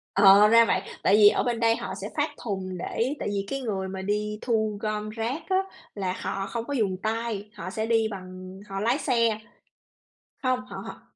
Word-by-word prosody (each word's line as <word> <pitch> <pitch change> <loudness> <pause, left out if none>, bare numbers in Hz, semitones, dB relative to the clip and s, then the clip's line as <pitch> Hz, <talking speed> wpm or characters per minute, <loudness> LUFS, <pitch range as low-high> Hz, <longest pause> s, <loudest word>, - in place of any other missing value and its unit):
Ờ, 200 +1 +8
ra 230 +1 +7
vậy, 190 - +1 0.2
tại 195 - +5
vì 210 -1 +8
ở - - +1
bên 240 -2 -1
đây 230 -1 +4
họ - - -5
sẽ - - -6
phát - - +2
thùng 190 -4 -3
để 235 +9 -1
tại - - -2
vì 200 -1 -2
cái 275 +3 -3
người 195 -5 -2
mà 190 0 -5
đi 210 +2 -1
thu 220 -3 0
gom 215 0 -2
rác 230 +8 -3
á, 375 - +2 0.4
là 190 -3 -1
họ 195 0 -3
không 235 -1 -4
có 285 - -4
dùng 200 -7 0
tay, 220 -2 -2
họ 185 -2 -6
sẽ 220 +3 -2
đi 225 -1 +2
bằng 185 0 -9
họ 195 0 -3
lái 235 +6 +2
xe. 230 -5 +2 1.0
Hông, 255 -1 +2
họ - - -9
họ, - - -9
215 Hz, 210 wpm, -26 LUFS, 195-230 Hz, 1.0 s, Ờ